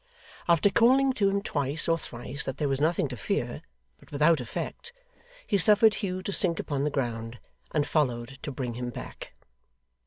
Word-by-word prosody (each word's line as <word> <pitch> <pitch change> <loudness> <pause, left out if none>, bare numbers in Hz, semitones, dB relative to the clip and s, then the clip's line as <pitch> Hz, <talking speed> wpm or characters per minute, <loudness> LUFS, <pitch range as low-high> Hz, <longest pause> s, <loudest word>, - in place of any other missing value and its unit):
After 170 +3 +4
calling 260 +5 +4
to 200 -5 +2
him 200 0 -1
twice 145 -1 +1
or 165 - +4
thrice 130 -2 -5
that 135 - -4
there 150 - 0
was 135 0 -1
nothing 160 -1 +2
to 125 - -5
fear, 110 - -2 0.4
but - - -20
without 150 +1 +3
effect, 295 - -6 0.5
he 200 - +1
suffered 210 +3 +6
Hugh 185 -3 -3
to 200 - -3
sink 175 -4 +1
upon 140 -2 -2
the - - +1
ground, 115 -4 -3 0.3
and 150 -2 +1
followed 135 -4 -1
to 145 - -5
bring 125 -3 -4
him 125 +1 -4
back. - - -9
150 Hz, 180 wpm, -27 LUFS, 130-195 Hz, 0.5 s, suffered